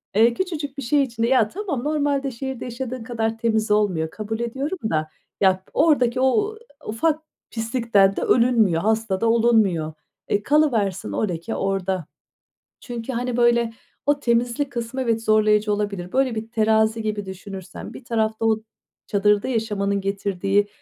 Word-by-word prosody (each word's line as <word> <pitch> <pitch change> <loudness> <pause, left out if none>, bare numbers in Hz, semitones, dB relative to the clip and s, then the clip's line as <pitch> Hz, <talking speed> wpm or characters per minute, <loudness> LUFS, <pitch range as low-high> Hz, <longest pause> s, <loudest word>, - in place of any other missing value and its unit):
Eee, 230 +2 +5
küçücük 305 -5 -4
bir 275 - -4
şey 280 +4 +3
içinde 235 -2 -1
ya 255 -4 +4
tamam 350 - -4
normalde 285 -2 0
şehirde 265 +1 -5
yaşadığın 250 0 -5
kadar 225 -2 -2
temiz 220 -2 0
olmuyor, 185 -7 +2
kabul 220 +3 -5
ediyorum 270 +9 -3
da 155 -1 -1 0.3
ya 190 -1 +5
p - - -26
oradaki 260 -5 +3
o 415 +11 +2 0.3
ufak 305 +9 0 0.3
pislikten 225 -4 +2
de - - -2
ölünmüyor, 225 -9 +3
hasta 220 -2 0
da 230 - +3
olunmuyor. 220 -9 +3 0.3
E, 205 0 0
kalıversin 235 - +1
o 215 - 0
leke 175 +6 -4
orda. 190 -3 -1 0.7
Çünkü 240 0 -6
hani 245 0 -2
böyle 235 -1 +3 0.3
o 290 0 +2
temizlik 240 +3 0
kısmı 240 +2 -4
evet 230 -3 0
zorlayıcı 215 -1 +3
olabilir. 200 -4 -3
Böyle 260 -3 +1
bir 220 +1 -5
terazi 220 0 +2
gibi 210 -2 -3
düşünürsen 190 0 -8
bir - - -10
tarafta 220 -1 -1
o 220 -1 +3 0.5
çadırda 205 +1 +2
yaşamanın 205 -5 -1
getirdiği 195 0 0
225 Hz, 150 wpm, -23 LUFS, 205-250 Hz, 0.7 s, Eee